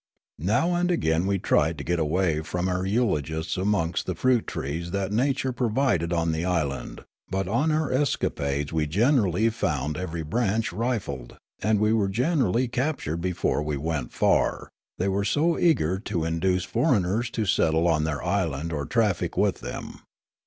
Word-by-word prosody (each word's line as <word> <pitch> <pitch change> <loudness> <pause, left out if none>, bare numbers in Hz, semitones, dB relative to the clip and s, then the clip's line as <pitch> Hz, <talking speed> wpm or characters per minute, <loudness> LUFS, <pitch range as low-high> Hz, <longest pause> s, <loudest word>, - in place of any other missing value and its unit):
Now 115 - +1
and 175 +1 +1
again 85 - +1
we 100 0 +1
tried 80 -3 +1
to 70 - -5
get 85 +2 0
away 80 0 +1
from 90 +3 -2
our 90 +1 -1
eulogists 80 - 0
amongst 95 -3 0
the 90 - -2
fruit 125 0 +2
trees 80 +5 -4
that 100 +1 -2
Nature 130 +3 +1
pro 120 -1 0
vided. 105 - +1
on 85 -1 +1
the 80 +1 -2
island; 80 -7 -2 0.3
but 95 -1 -1
on 125 +11 +1
our 155 -2 0
escapades 75 - -1
we 80 -1 +1
generally 110 - +2
found 75 - -2
every 85 -2 -4
branch 110 +5 0
rifled; 105 - -3 0.2
and 105 +1 +2
we 105 +1 +3
were 105 -3 +2
generally 125 - +1
cap 135 +5 -1
tured 80 +3 -3
before 90 -4 0
we 75 -1 -2
went 75 -3 -3
far, - - +1 0.3
they 95 - 0
were 100 +1 0
so 155 +11 +1
eager 95 - +2
to 90 -6 -2
induce 90 +3 0
foreigners 110 - +1
to 115 -2 -2
settle 80 -2 +2
on 80 -2 +2
their 75 -2 -2
island 85 -4 -1
or 70 -2 -3
traffic 105 -8 0
with - - +2
them. - - -7
95 Hz, 170 wpm, -26 LUFS, 80-115 Hz, 0.3 s, we